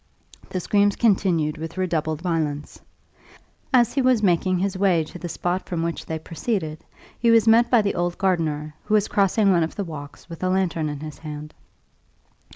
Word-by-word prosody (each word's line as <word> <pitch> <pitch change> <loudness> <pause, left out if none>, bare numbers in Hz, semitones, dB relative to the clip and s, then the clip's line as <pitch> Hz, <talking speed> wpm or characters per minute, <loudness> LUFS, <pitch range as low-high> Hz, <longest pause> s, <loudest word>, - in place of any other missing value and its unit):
The 185 - -2
screams 205 +2 +2
continued 175 -8 +1
with 160 +3 -7
redoubled 160 -3 -1
violence. 155 -4 -2 0.9
As 245 -4 +4
he 275 - +1
was 255 -4 +3
making 185 0 +2
his 195 +2 -1
way 185 -4 +2
to 180 - -10
the 175 - -5
spot 175 +3 -2
from 170 -2 -2
which 170 0 -4
they 160 - -2
proceeded, 160 -1 -4 0.4
he 235 - +2
was 230 -1 +5
met 235 +2 +5
by 235 -4 +4
the 200 - 0
old 175 0 -1
gardener, 155 -5 -1
who 215 - +2
was 210 -1 +2
crossing 200 +1 +3
one 175 -2 +3
of 160 - -2
the 200 - -2
walks 145 -5 -9
with 165 -2 -10
a 185 - 0
lantern 180 -4 0
in 145 -1 -6
his 155 -2 -8
hand. 150 -1 -8
175 Hz, 185 wpm, -23 LUFS, 160-200 Hz, 0.9 s, was